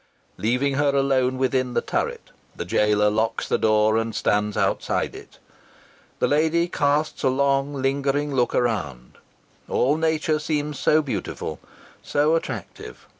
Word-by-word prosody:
Leaving 125 Hz, +6 st, +1 dB
her 145 Hz, -1 st, +2 dB
alone 130 Hz, -2 st, +2 dB
within 130 Hz, -1 st, 0 dB
the -, -, +4 dB
turret, -, -, -3 dB, 0.2 s
the -, -, -5 dB
jailer 105 Hz, 0 st, +2 dB
locks 110 Hz, +2 st, 0 dB
the -, -, 0 dB
door 110 Hz, 0 st, +3 dB
and 115 Hz, -1 st, -2 dB
stands 105 Hz, 0 st, 0 dB
outside -, -, 0 dB
it. -, -, -13 dB, 0.8 s
The -, -, +1 dB
lady 160 Hz, +3 st, +2 dB
casts 150 Hz, -1 st, 0 dB
a 135 Hz, -, +2 dB
long, 140 Hz, +1 st, +1 dB
lingering 140 Hz, +2 st, 0 dB
look 125 Hz, -2 st, +1 dB
around. 85 Hz, -, -2 dB, 0.5 s
All 140 Hz, +5 st, +2 dB
nature 160 Hz, -1 st, 0 dB
seems 150 Hz, -2 st, -2 dB
so 155 Hz, +1 st, +3 dB
beautiful 140 Hz, -, -4 dB, 0.4 s
so 150 Hz, +2 st, +1 dB
attractive. 110 Hz, -, -6 dB
135 Hz, 135 wpm, -23 LUFS, 115-145 Hz, 0.8 s, the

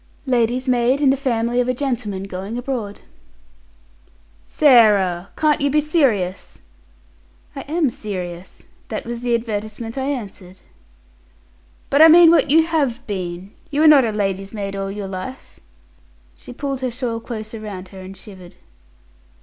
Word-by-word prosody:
"Lady's 250 Hz, 0 st, 0 dB
maid 250 Hz, +2 st, +2 dB
in 280 Hz, -2 st, +4 dB
the -, -, +2 dB
family 245 Hz, -3 st, 0 dB
of 245 Hz, -, -2 dB
a 255 Hz, -, 0 dB
gentleman 235 Hz, -8 st, -3 dB
going 195 Hz, +4 st, -6 dB
abroad." 245 Hz, -5 st, -5 dB, 1.5 s
"Sarah, 205 Hz, -, +4 dB
you -, -, -20 dB
can't 295 Hz, -2 st, +2 dB
be 300 Hz, -, +3 dB
serious?" 255 Hz, -, 0 dB, 1.0 s
"I -, -, -5 dB
am 310 Hz, -3 st, 0 dB
serious. 185 Hz, -4 st, -7 dB, 0.2 s
That -, -, -5 dB
was 235 Hz, 0 st, -5 dB
the 240 Hz, -1 st, +1 dB
advertisement 225 Hz, +1 st, -4 dB
I 265 Hz, -, -2 dB
answered." 195 Hz, -8 st, -6 dB, 1.3 s
"But 280 Hz, +2 st, +4 dB
I 320 Hz, -, +10 dB
mean 330 Hz, +1 st, +8 dB
what 335 Hz, -, +3 dB
you 320 Hz, +3 st, +5 dB
have 275 Hz, -7 st, -1 dB
been. 185 Hz, -3 st, -5 dB, 0.2 s
You 295 Hz, 0 st, -1 dB
were 315 Hz, -, +6 dB
not 295 Hz, -3 st, +7 dB
a 225 Hz, -, 0 dB
lady's 195 Hz, -1 st, -3 dB
maid 200 Hz, -1 st, -4 dB
all 195 Hz, 0 st, -3 dB
your 200 Hz, 0 st, -5 dB
life?" 190 Hz, +8 st, -8 dB, 0.8 s
She -, -, -12 dB
pulled 270 Hz, +1 st, -4 dB
her 255 Hz, -, -1 dB
shawl 235 Hz, -1 st, -4 dB
closer 225 Hz, -1 st, -7 dB
round 195 Hz, -4 st, -8 dB
her 190 Hz, -, -12 dB
and 190 Hz, +1 st, -10 dB
shivered. 185 Hz, -3 st, -13 dB
230 Hz, 150 wpm, -20 LUFS, 195-270 Hz, 1.5 s, I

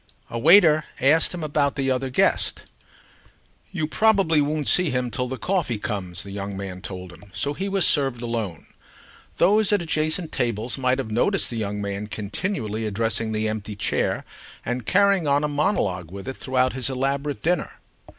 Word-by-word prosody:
A 115 Hz, -, -3 dB
waiter 160 Hz, -, +6 dB, 0.2 s
asked 150 Hz, +5 st, +4 dB
him 175 Hz, -3 st, -5 dB
about 145 Hz, -2 st, +1 dB
the 135 Hz, -2 st, 0 dB
other 130 Hz, +1 st, -1 dB
guest. 125 Hz, -, +1 dB, 1.1 s
"You 155 Hz, -, -1 dB
probably 195 Hz, -3 st, +3 dB
won't 150 Hz, 0 st, -1 dB
see 180 Hz, -3 st, +4 dB
him 125 Hz, -2 st, -1 dB
till 125 Hz, +3 st, -2 dB
the 130 Hz, +1 st, -5 dB
coffee 165 Hz, -, -1 dB
comes," 100 Hz, -5 st, -3 dB
the 100 Hz, -, -9 dB
young 100 Hz, 0 st, -5 dB
man 95 Hz, -2 st, -6 dB
told 90 Hz, -1 st, -7 dB
him; 100 Hz, -, -14 dB
so 120 Hz, -, -1 dB
he 195 Hz, +6 st, -3 dB
was 195 Hz, -3 st, +2 dB
served 135 Hz, -5 st, +2 dB
alone. 115 Hz, -8 st, -4 dB, 0.7 s
Those 210 Hz, +1 st, +4 dB
at 205 Hz, -, +3 dB
adjacent 155 Hz, +1 st, -1 dB
tables 120 Hz, 0 st, -1 dB
might 130 Hz, -1 st, +1 dB
have 125 Hz, -5 st, -4 dB
noticed 180 Hz, -, +2 dB
the 115 Hz, -, -4 dB
young 105 Hz, -1 st, -3 dB
man 100 Hz, +1 st, -4 dB
continually 110 Hz, -, -3 dB
addressing 110 Hz, +1 st, -1 dB
the 110 Hz, 0 st, -1 dB
empty 110 Hz, -1 st, -4 dB
chair 100 Hz, -, -1 dB, 0.4 s
and 125 Hz, -1 st, -3 dB
carrying 200 Hz, -4 st, +3 dB
on 140 Hz, +1 st, +3 dB
a -, -, +2 dB
monologue 145 Hz, -, 0 dB
with 100 Hz, +5 st, -9 dB
it 130 Hz, -, -4 dB
throughout 130 Hz, -1 st, 0 dB
his 130 Hz, -1 st, 0 dB
elaborate 140 Hz, +2 st, -2 dB
dinner. 175 Hz, 0 st, -1 dB
130 Hz, 175 wpm, -24 LUFS, 110-155 Hz, 1.1 s, waiter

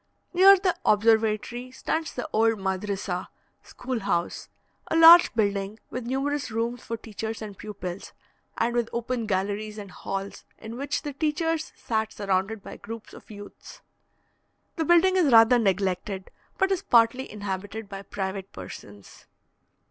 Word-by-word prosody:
Near 385 Hz, +2 st, +8 dB
the 370 Hz, -1 st, 0 dB
observatory 220 Hz, +3 st, +2 dB
stands 315 Hz, +5 st, -3 dB
the -, -, -5 dB
old 225 Hz, +1 st, +3 dB
madrissa 190 Hz, -1 st, -3 dB, 0.3 s
(school 250 Hz, -1 st, -5 dB
house), 175 Hz, -4 st, -2 dB, 0.4 s
a -, -, 0 dB
large 330 Hz, +1 st, +9 dB
building, 200 Hz, -1 st, -1 dB
with 250 Hz, -1 st, -5 dB
numerous 275 Hz, +1 st, -1 dB
rooms 230 Hz, +2 st, -2 dB
for 230 Hz, -, -5 dB
teachers 220 Hz, 0 st, -6 dB
and 210 Hz, -2 st, -7 dB
pupils, 195 Hz, -3 st, -7 dB, 0.5 s
and 235 Hz, +1 st, +1 dB
with 240 Hz, -1 st, 0 dB
open 235 Hz, -1 st, -2 dB
galleries 205 Hz, +2 st, -2 dB
and 200 Hz, -3 st, -8 dB
halls, 195 Hz, +2 st, -6 dB
in 225 Hz, +1 st, -8 dB
which 280 Hz, +4 st, -3 dB
the 290 Hz, -2 st, -5 dB
teachers 315 Hz, +2 st, -1 dB
sat 220 Hz, -1 st, -2 dB
surrounded 200 Hz, +1 st, -1 dB
by -, -, -9 dB
groups 225 Hz, -1 st, -9 dB
of -, -, -14 dB
youths. 205 Hz, -1 st, -12 dB, 0.9 s
The 320 Hz, -, -1 dB
building 345 Hz, +3 st, +5 dB
is 325 Hz, -7 st, +3 dB
rather 230 Hz, +1 st, +7 dB
neglected, 190 Hz, -1 st, -1 dB, 0.3 s
but 385 Hz, 0 st, +2 dB
is 380 Hz, -, +1 dB
partly 235 Hz, +2 st, +3 dB
inhabited 205 Hz, +1 st, -5 dB
by 195 Hz, -1 st, -7 dB
private 195 Hz, -1 st, -5 dB
persons. 100 Hz, +2 st, -11 dB
220 Hz, 140 wpm, -26 LUFS, 200-255 Hz, 0.9 s, large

